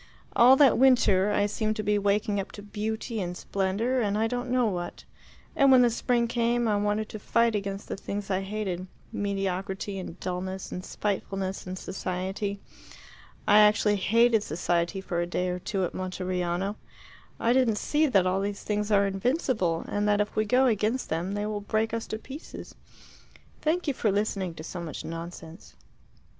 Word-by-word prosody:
All 250 +3 +8
that 270 -4 +5
winter 210 -7 +4
I 205 0 +2
seemed 215 +1 -1
to 215 - -3
be 210 0 +2
waking 205 0 +1
up 195 - -5
to 205 - -9
beauty 220 +2 -3
and 175 -1 -4
splendour 200 +9 -1
and 205 -2 0
I 220 - +2
don't 245 +2 -2
know 250 -1 +2
what; 175 -5 -3 0.5
and 275 -1 +5
when 255 -1 +7
the 240 - +4
spring 235 +1 +1
came, 235 0 +1
I 210 - +2
wanted 210 +1 0
to 215 - -7
fight 230 +2 +2
against 200 -1 -3
the - - -3
things 200 0 -5
I 190 0 +1
hated 195 -2 -3 0.2
mediocrity 195 0 -2
and 185 -1 -8
dulness 185 +1 -4
and 180 - -5
spitefulness 195 -2 -3
and 185 +1 -5
society. 190 +2 -3 0.9
I 210 +1 +7
actually 210 0 +4
hated 230 +3 +4
society 175 +1 -1
for 175 -3 -2
a 175 - -1
day 180 +1 -1
or 180 0 -2
two 190 0 -1
at - - -5
Monteriano. 185 +1 -2 0.6
I 235 - +3
didn't 250 -5 +3
see 305 +7 +2
that 195 -9 +3
all 185 +1 +1
these 200 0 -3
things 210 0 -1
are 200 -1 +5
invincible, 195 - 0
and 205 0 -1
that 205 0 +3
if 210 0 -1
we 215 - +2
go 255 +4 +4
against 225 +1 +1
them 175 +5 -2
they 205 0 -2
will 210 -1 -3
break 220 +2 -1
us 230 0 -3
to 215 - -3
pieces. 270 +7 -9 0.9
Thank 335 +3 0
you 285 - +2
for 220 -4 +1
listening 195 -4 -1
to 155 - -8
so 175 +2 -6
much 165 -3 -6
nonsense." 165 +1 -8
205 Hz, 180 wpm, -27 LUFS, 185-225 Hz, 0.9 s, All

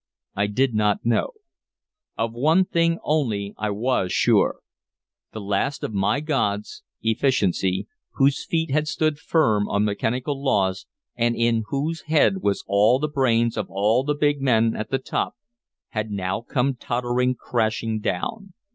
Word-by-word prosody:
I 100 +1 +1
did 125 +4 +1
not 105 -1 +1
know. 115 -1 +1 0.9
Of 115 0 -1
one 155 +10 +3
thing 165 -1 +1
only 110 -10 -1
I 105 - -2
was 105 -3 0
sure. - - +2 0.7
The 110 - -7
last 100 +7 -1
of - - -3
my 100 +8 +1
gods, 105 -9 -2 0.2
Efficiency, 110 -6 +1 0.3
whose 140 0 +2
feet 160 -3 -1
had 150 +2 +1
stood 155 -1 0
firm 110 -12 +1
on 100 +1 +1
mechanical 125 +7 -2
laws 95 -8 0 0.3
and 120 0 +1
in 115 -1 +1
whose 155 +4 -2
head 160 +5 +3
were 100 - +2
all 105 +5 +4
the 150 +3 -1
brains 120 -5 +1
of - - -3
all 105 +6 +2
the 150 +1 0
big 145 -1 +1
men 115 -4 +2
at 110 - -4
the 135 - +1
top, 130 - -3 0.5
had 110 0 -3
now 95 0 -2
come 130 +3 0
tottering 125 +1 -1
crashing 110 -2 -1
down. 190 - -4
120 Hz, 150 wpm, -23 LUFS, 105-140 Hz, 0.9 s, all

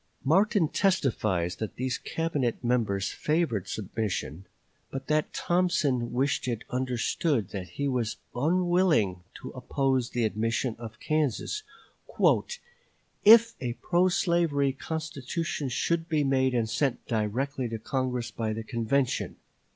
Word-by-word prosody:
Martin 190 - +3
testifies 110 - +1
that 110 -3 -5
these 130 0 -2
Cabinet 145 -8 -2
members 110 -5 +1
favored 150 - 0
submission, 100 - -3 0.4
but 135 0 -5
that 155 +1 +1
Thompson 175 -9 +1
wished 130 +1 0
it 120 -3 -2
understood 125 - 0
that 95 -4 -6
he 140 - 0
was 125 -5 -1 0.2
unwilling 165 - +2
to - - -8
oppose 130 -1 0
the 120 - -1
admission 115 +2 -1
of 110 -2 -9
Kansas 155 - -1 1.6
"if 230 +2 +8
a 120 -2 -2
pro 180 +7 +2
slavery 170 -7 +2
constitution 155 0 -3
should 165 +6 0
be 155 -3 +2
made 130 -2 +2
and 115 -2 +1
sent 135 +3 -1
directly 120 +4 -1
to 115 - -3
Congress 125 0 -2
by 110 -1 -2
the 110 +1 -4
convention." 125 +4 0
130 Hz, 120 wpm, -28 LUFS, 115-155 Hz, 1.6 s, if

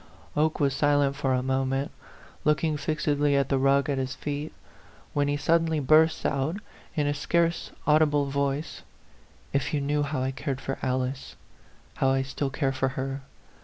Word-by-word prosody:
Oke 155 +1 +1
was 140 -2 +2
silent 145 -1 +2
for 135 -2 0
a 125 - 0
moment, 135 +1 0 0.5
looking 150 +1 +2
fix 155 +1 -2
edly 145 -1 +2
at 135 - 0
the 135 - +2
rug 135 +1 +3
at 140 -2 0
his 130 0 -3
feet, 145 +1 -4 0.6
when 145 -1 +1
he 145 0 0
suddenly 160 +1 +2
burst 155 +3 +4
out, 140 +6 0 0.4
in 150 -3 +1
a 145 - +1
scarce 170 +3 0 0.2
audible 150 -1 +4
voice 140 +2 -2 0.4
" - - -29 0.3
If 140 +2 0
you - - +1
knew 145 +1 0
how 140 -2 -1
I 130 - 0
cared 135 0 -4
for 135 -1 -4
Alice 130 +1 -2 0.6
how 135 - +3
I 135 0 +2
still 140 +1 -3
care 135 0 0
for 135 0 0
her! 135 +1 -3
140 Hz, 175 wpm, -27 LUFS, 135-150 Hz, 0.6 s, burst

